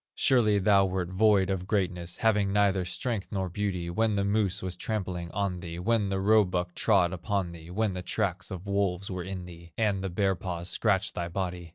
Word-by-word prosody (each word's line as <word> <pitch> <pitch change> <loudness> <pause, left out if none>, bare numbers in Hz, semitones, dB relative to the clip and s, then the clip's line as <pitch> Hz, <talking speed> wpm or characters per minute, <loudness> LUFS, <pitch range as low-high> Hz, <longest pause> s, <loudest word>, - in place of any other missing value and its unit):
"Surely 110 -6 +4
thou 100 0 +4
wert 95 -2 -1
void 100 0 +3
of 95 -1 -3
greatness, 90 -4 -1
Having 105 -3 +2
neither 100 -2 +2
strength 105 +3 -3
nor 95 -2 -2
beauty, 90 -2 -2
When 110 +5 +1
the 100 - +1
moose 100 -2 0
was 90 -1 -3
trampling 90 -3 -3
on 95 -1 -2
thee, 85 -2 -7
When 105 +2 +1
the 95 0 -1
roebuck 95 -4 +2
trod 95 -4 +3
upon 95 0 -2
thee, 85 0 -11
When 105 +2 0
the 90 - -4
tracks 100 -1 -2
of 95 0 -7
wolves 100 -1 -1
were 90 -1 -3
in 95 0 -6
thee, 85 -1 -13
And 105 -4 +1
the 95 - -2
bear 95 +2 +1
paws 90 -1 -5
scratched 100 -4 +1
thy 85 -1 -3
body. 90 -1 -4
95 Hz, 200 wpm, -28 LUFS, 90-100 Hz, -, Surely